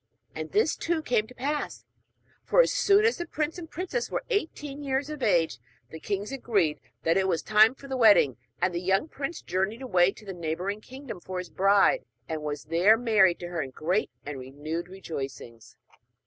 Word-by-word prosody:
And - - -6
this 410 -6 +2
too 330 -2 -1
came 225 -5 +1
to 250 - -15
pass; 290 +3 -3 0.6
for, - - +2
as - - +6
soon 425 -4 +4
as 460 - +3
the 345 - -5
prince 310 +2 -2
and 325 -2 -9
princess 275 -9 -3
were - - -2
eighteen 295 - -2
years 275 +1 -1
of 300 -2 -7
age, 170 - +2 0.3
the 160 - -8
kings 200 +6 -3
agreed 205 - 0 0.2
that 165 +2 +3
it 190 0 +2
was 170 -3 0
time 215 +3 +5
for 275 - -12
the 265 - -3
wedding; 210 - +5 0.2
and 180 0 +1
the 170 - -2
young 195 - +1
prince 290 +2 -5
journeyed 200 +7 -2
away 185 -6 +3
to 215 - -15
the 195 - -5
neighbouring 175 +5 -3
kingdom 260 -4 -9
for 185 +1 -6
his 180 -1 -5
bride, 200 - +4 0.2
and 160 -1 -3
was 150 -1 -4
there 175 +7 +4
married 215 -7 +4
to 175 - -5
her 170 -3 -2
with 130 -1 -10
great 180 +7 0 0.2
and 145 -2 -5
renewed 150 +6 -5
rejoicings. 135 - -8
205 Hz, 195 wpm, -27 LUFS, 170-275 Hz, 0.6 s, as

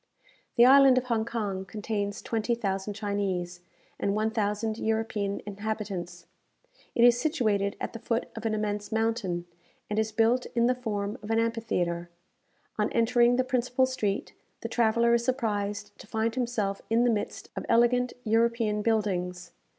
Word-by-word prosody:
The 240 -1 +7
island 270 0 +7
of 255 - +2
Hong 230 -3 0
Kong 205 -5 -3
contains 205 +1 -4
twenty 230 +1 0
thousand 200 -2 -3
Chinese, 195 -4 -2 0.4
and 200 0 0
one 215 +1 +1
thousand 215 +1 -1
European 220 -2 -1
inhabitants. 205 -4 -5 0.7
It 235 - +4
is 240 0 +6
situated 215 -10 +1
at - - -4
the 230 - -6
foot 230 +1 -1
of 225 - -6
an 215 - 0
immense 210 -1 -3
mountain, 220 -6 -1 0.5
and 210 - +1
is 220 0 0
built 230 +3 +2
in 235 0 +3
the 250 - +4
form 215 -2 -3
of 210 - -9
an 225 - +2
amphitheatre. 180 -7 -1 0.7
On 210 - +1
entering 240 +1 +4
the 255 - +2
principal 255 0 +1
street, 215 -6 -2 0.3
the - - -3
traveller 235 0 +3
is 235 0 +3
surprised 210 -5 -2
to - - -12
find 220 +1 -1
himself 230 -6 -1
in 230 +2 +3
the 245 - +4
midst 210 -2 -3
of - - -4
elegant 245 +1 +3
European 225 -1 +1
buildings. 180 -5 -1
220 Hz, 160 wpm, -28 LUFS, 205-235 Hz, 0.7 s, The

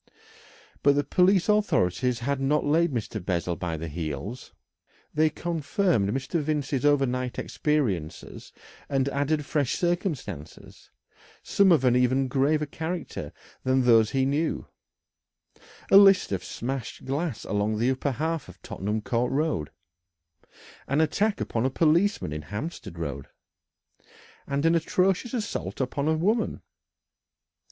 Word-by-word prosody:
But 140 0 +4
the 145 - +2
police 180 +5 +3
authorities 125 - +1
had 140 +3 -1
not 150 +3 +1
laid 165 +3 +2
Mr. 110 -5 -4
Bessel 90 -1 -1
by 85 -2 -3
the 80 +2 -5
heels. 80 - -5 0.6
They 155 +1 +3
confirmed 165 - 0
Mr. 135 +8 -1
Vincey's 145 -3 -1
overnight 130 -4 +1
experiences 100 - -2 0.4
and 135 -1 +1
added 145 +2 0
fresh 140 -2 0
circumstances, 170 - -4 0.5
some 200 -2 +4
of 145 -6 +4
an 125 -1 +4
even 130 +2 +2
graver 145 +4 +2
character 160 +4 -5 0.3
than 130 0 +2
those 115 -3 +5
he 135 -1 +1
knew 145 +4 -1 1.3
a 195 - +9
list 195 - +6
of 95 -2 -2
smashed 125 +4 -5
glass 140 -1 -2
along 105 +1 0
the 120 +4 +2
upper 130 +1 -1
half 160 - -2
of 95 +1 -14
Tottenham 105 +3 -3
Court 125 0 0
Road, 140 - 0 1.2
an 140 +3 +1
attack 200 +7 +1
upon 115 - -1
a 130 - +2
policeman 165 - +2
in 75 - -4
Hampstead 105 - -6
Road, 70 -4 -5 1.2
and 140 +2 -1
an 165 - +4
atrocious 185 +7 +1
assault 105 - -4
upon 140 +2 -1
a 160 0 +2
woman. 215 +8 0
135 Hz, 130 wpm, -26 LUFS, 110-160 Hz, 1.3 s, a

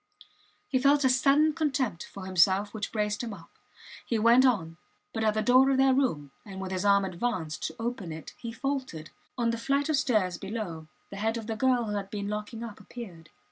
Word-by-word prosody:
He 260 - +1
felt 285 +2 +4
a 260 - +4
sudden 280 +4 +4
contempt 265 - -1
for 195 -2 -8
himself 190 +2 +3
which 215 -1 -4
braced 210 -1 -1
him 230 -4 -5
up. 165 - -16 0.5
He 230 - -1
went 235 +4 +6
on, 165 -9 0 0.4
but 225 - -2
at 215 -1 +2
the 215 - +1
door 255 +4 +5
of 270 - +2
their 265 0 +5
room 160 - 0
and 195 -2 -9
with 190 -1 -5
his 185 0 -2
arm 200 -1 +4
advanced 180 -4 -3
to - - -9
open 225 -7 -4
it, 155 0 -8
he 235 - -5
faltered. 260 - -4 0.3
On 235 -1 +1
the 230 - -3
flight 280 +5 0
of 310 - +3
stairs 215 -11 +1
below 195 -6 -5 0.2
the 200 - -7
head 225 +3 0
of 225 - -6
the 225 0 -3
girl 250 +1 +2
who 210 - -3
had 195 -1 -5
been 205 -1 -4
locking 210 +2 -5
up 225 -3 -8
appeared. 175 -10 -10
220 Hz, 215 wpm, -28 LUFS, 190-255 Hz, 0.5 s, went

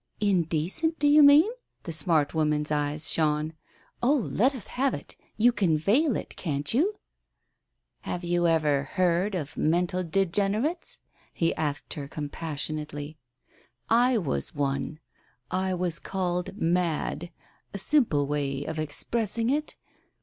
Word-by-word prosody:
"Indecent, 190 - 0
do 290 - +2
you 295 +1 +7
mean? 290 +5 +8 0.2
" - - -48
The 170 - -5
smart 155 -1 +1
woman's 150 -1 0
eyes 150 +1 +2
shone. 155 0 +1 0.5
"Oh, 265 +5 +4
let 260 +1 +1
us 240 - -3
have 265 +1 0
it. - - -9 0.2
You 235 +3 +5
can 180 -9 +1
veil 235 - +2
it, - - -5
can't 145 -2 -2
you? 360 - +2 0.4
" - - -52
" - - -53
Have 175 - -3
you 175 0 +1
ever 155 -4 +2
heard 185 +5 0
of 150 -5 -5
mental 175 +3 +1
degenerates? 200 - 0 0.2
" - - -32
he 165 -1 +1
asked 145 -1 -2
her 140 -2 -6
compassionately. 150 0 -5 0.7
"I 245 +2 +4
was 105 - -2
one. 140 +2 -2 0.5
I 185 0 0
was 175 -2 -1
called 185 +1 -3
mad 170 -1 0 0.2
— - - -38
a - - -5
simple 195 - +3
way 140 -1 -2
of 160 0 -4
expressing 225 - -1
it. 300 +2 -2
175 Hz, 145 wpm, -27 LUFS, 150-215 Hz, 0.7 s, mean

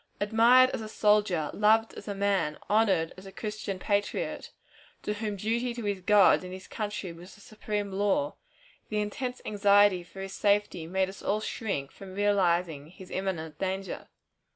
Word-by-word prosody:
Admired 235 +5 +5
as - - -4
a 215 - -7
soldier, 210 -8 +2
loved 220 +2 +3
as - - -10
a 200 - -3
man, 195 -6 0
honored 195 -7 +2
as 190 +1 -11
a - - -9
Christian 210 -2 -5
patriot, 200 +2 -2 0.5
to 210 - -1
whom 210 -1 -3
duty 235 +4 -1
to 240 - -5
his 200 -2 -2
God 200 -1 +5
and 180 - -8
his 185 0 -9
country 205 -5 -4
was 175 +5 -13
a - - -19
supreme 210 -1 -4
law, 205 +10 0 0.6
the 215 - -1
intense 245 +5 -4
anxiety 205 -2 +4
for 175 +3 -11
his 195 0 -6
safety 200 -5 +1
made 190 +2 +1
us 190 - -10
all 210 +2 0
shrink 195 -10 -3
from 190 -1 -11
realizing 175 -7 +1
his 185 +2 -13
imminent 165 -5 -3
danger. 190 -1 -3
200 Hz, 170 wpm, -28 LUFS, 185-210 Hz, 0.6 s, Admired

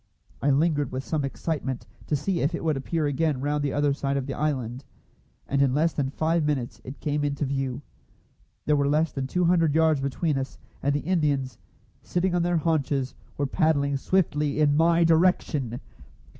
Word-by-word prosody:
I 145 - +2
lingered 145 -1 +2
with 130 +1 -3
some 155 -1 -1
excitement, 135 -2 -3 0.2
to 150 - +1
see 175 +5 -1
if 150 +5 0
it - - -5
would 155 -2 +1
appear 155 +4 -1
again 145 0 0
round 145 +2 -1
the 140 - 0
other 145 -1 +2
side 140 0 -1
of 135 - -2
the 135 - -4
island; 130 -4 -2 0.6
and 140 0 +1
in 135 -1 +3
less 160 +2 +2
than 135 -3 -1
five 160 +3 0
minutes 140 -5 -2
it 130 +3 -9
came 150 0 -1
into 145 0 -1
view. 135 0 -2 0.8
There 150 - +3
were 140 -1 +2
less 155 +2 +2
than 135 -1 -3
two 180 +6 0
hundred 165 -3 +3
yards 160 -3 +3
between 140 +2 0
us, 135 0 -5 0.2
and 140 +1 +1
the 145 - 0
Indians, 145 - 0 0.4
sitting 180 +1 -1
on 175 - +2
their 175 0 +1
haunches, 145 -5 0 0.2
were 145 - 0
paddling 140 -1 +1
swiftly 150 -2 0
in 145 -1 +4
my 165 +2 +4
direction. 160 -7 +2
145 Hz, 185 wpm, -26 LUFS, 135-160 Hz, 0.8 s, in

